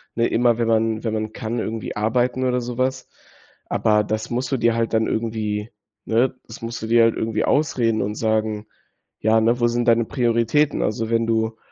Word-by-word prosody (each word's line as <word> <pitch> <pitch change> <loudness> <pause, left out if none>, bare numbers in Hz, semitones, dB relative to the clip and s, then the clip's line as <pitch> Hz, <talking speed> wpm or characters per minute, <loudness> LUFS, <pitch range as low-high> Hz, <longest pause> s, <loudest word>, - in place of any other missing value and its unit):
ne? 115 0 +2
Immer, 120 -1 +2
wenn 115 -1 0
man 110 -1 +1
wenn 110 -2 -1
man 110 0 -2
kann, 115 +2 -4
irgendwie 110 -1 -4
arbeiten 120 +4 0
oder 125 -1 +1
so 120 0 -6
was. 130 0 -1 0.6
Aber 105 -1 +2
das 110 +1 -3
musst 125 +3 -2
du 135 - +1
dir 115 -1 +2
halt 115 0 -1
dann 110 0 +2
irgendwie 110 -1 -2 0.4
ne? 125 +4 +1
Das 110 - -11
musst 115 +1 -5
du 110 - -4
dir 115 0 +5
halt 115 0 +3
irgendwie 110 -1 -1
ausreden 120 -7 +1
und 105 +2 -2
sagen: 110 -1 -1 0.5
„Ja, 110 +1 +3
ne? 115 +2 +2
Wo 120 - +3
sind 120 +1 -1
deine 115 0 +4
Prioritäten?“ 120 +5 +1
Also, 110 +1 -1
wenn 115 0 +1
du 110 0 0
115 Hz, 200 wpm, -22 LUFS, 110-120 Hz, 0.6 s, dir